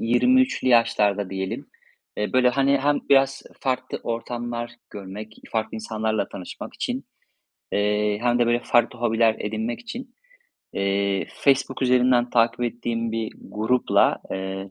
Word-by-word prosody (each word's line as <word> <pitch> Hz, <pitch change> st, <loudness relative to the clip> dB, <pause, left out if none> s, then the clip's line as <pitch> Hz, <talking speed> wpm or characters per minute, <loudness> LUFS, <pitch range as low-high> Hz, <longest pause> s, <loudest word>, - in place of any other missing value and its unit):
23'lü 250 Hz, -, +3 dB
yaşlarda 105 Hz, -5 st, +3 dB
diyelim, 95 Hz, 0 st, -4 dB, 0.5 s
eee, 105 Hz, -, -2 dB
böyle 125 Hz, -1 st, +5 dB
hani 135 Hz, +2 st, +3 dB
hem 145 Hz, +1 st, +2 dB
biraz 135 Hz, 0 st, +4 dB, 0.2 s
farklı 130 Hz, -1 st, -2 dB
ortamlar 120 Hz, 0 st, -4 dB, 0.2 s
görmek, 105 Hz, +2 st, -8 dB, 0.2 s
farklı 110 Hz, -1 st, -1 dB
insanlarla 110 Hz, -2 st, -2 dB
tanışmak 90 Hz, -, -8 dB
için, -, -, -3 dB, 0.7 s
eee, 105 Hz, 0 st, +1 dB
hem 120 Hz, 0 st, +2 dB
de 120 Hz, -, +3 dB
böyle 120 Hz, +1 st, +2 dB
farklı 120 Hz, +1 st, +2 dB
hobiler 115 Hz, -1 st, +2 dB
edinmek 110 Hz, +3 st, -3 dB
için, 245 Hz, +2 st, -8 dB, 0.6 s
eee, 100 Hz, 0 st, 0 dB
Facebook 135 Hz, -1 st, +1 dB
üzerinden 125 Hz, -1 st, +3 dB
takip 115 Hz, 0 st, +2 dB
ettiğim 115 Hz, -1 st, -2 dB
bir 115 Hz, -1 st, -2 dB
grupla, 110 Hz, +4 st, +2 dB
eee, 95 Hz, 0 st, -4 dB
115 Hz, 125 wpm, -24 LUFS, 105-125 Hz, 0.7 s, böyle